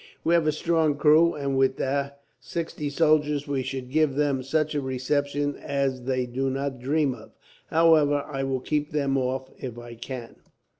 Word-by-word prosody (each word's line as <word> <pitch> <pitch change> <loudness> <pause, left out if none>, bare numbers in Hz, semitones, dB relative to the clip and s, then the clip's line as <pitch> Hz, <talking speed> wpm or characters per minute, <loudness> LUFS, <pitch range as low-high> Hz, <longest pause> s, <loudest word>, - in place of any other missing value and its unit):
We 170 - +2
have 165 -2 +3
a - - +4
strong 160 -1 +1
crew, 155 +3 +5
and 140 -2 -1
with 135 0 +3
the 140 +1 -1 0.3
sixty 150 +3 -4
soldiers 150 -1 +2
we 140 -2 -1
should 130 -1 -5
give 155 -2 +2
them 145 -2 +1
such 155 +3 0
a 145 - 0
reception 145 +2 -1
as 135 -3 -2
they 130 -1 0
do 130 +2 -2
not 135 0 -3
dream 140 +2 +1
of. 110 -3 -14 0.3
However, 155 -3 +4
I 135 -2 -4
will 135 -1 -1
keep 150 +1 -1
them 140 -3 0
off, 130 0 -2
if 120 -3 -6
I 120 0 -9
can. 120 0 -8
140 Hz, 180 wpm, -26 LUFS, 130-150 Hz, 0.3 s, crew